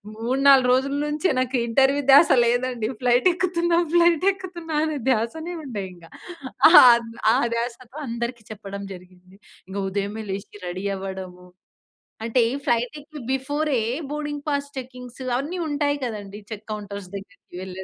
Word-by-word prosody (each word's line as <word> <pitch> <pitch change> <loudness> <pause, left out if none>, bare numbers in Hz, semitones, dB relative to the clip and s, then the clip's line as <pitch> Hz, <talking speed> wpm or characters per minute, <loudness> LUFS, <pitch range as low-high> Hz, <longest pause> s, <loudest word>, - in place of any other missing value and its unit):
3,4 260 +2 +4
రోజుల 275 +2 0
నుంచే 305 +5 0
నాకు 255 0 0
ఇంటర్వ్యూ 275 +4 +3
ధ్యాస 285 +3 +8 0.2
లేదండి, 245 -1 0
ఫ్లైట్ 245 +8 +4
ఎక్కుతున్నా 345 -1 +1 0.2
ఫ్లైట్ 345 0 +4
ఎక్కుతున్నా 345 -5 -6
అనే 310 -2 -2
ధ్యాసనే 320 +10 -2
ఉండే 210 -7 -5
ఇంగా. 170 -2 -17 0.6
ఆ! - - +3 0.6
ఆ - - +3 0.2
ధ్యాసతో 240 +3 -5
అందరికి 235 0 -4
చెప్పడం 200 -1 -7
జరిగింది. 185 +1 -18 0.3
ఇంక 195 - -6
ఉదయమే 205 +3 -3
లేచి 200 +1 -7
రెడీ 185 +3 -5
అవ్వడము, 190 -2 -7 0.8
అంటే 235 +2 +2 0.2
ఫ్లైట్ 240 +5 0
ఎక్కే 295 +1 -11
బిఫోరే 285 +1 -1 0.3
బోర్డింగ్ 295 -1 -4
పాస్ 285 -1 -1
చెకింగ్స్ 250 -1 -8
అవి 255 - -3
అన్నీ 310 +7 -4
ఉంటాయి 290 -1 0
కదండీ. 205 -3 -6
చెక్ 215 -1 -8
కౌంటర్స్ 200 -2 -6
దగ్గరికి 200 -2 -11
వెళ్ళే 190 0 -7
250 Hz, 140 wpm, -23 LUFS, 205-290 Hz, 0.8 s, ధ్యాస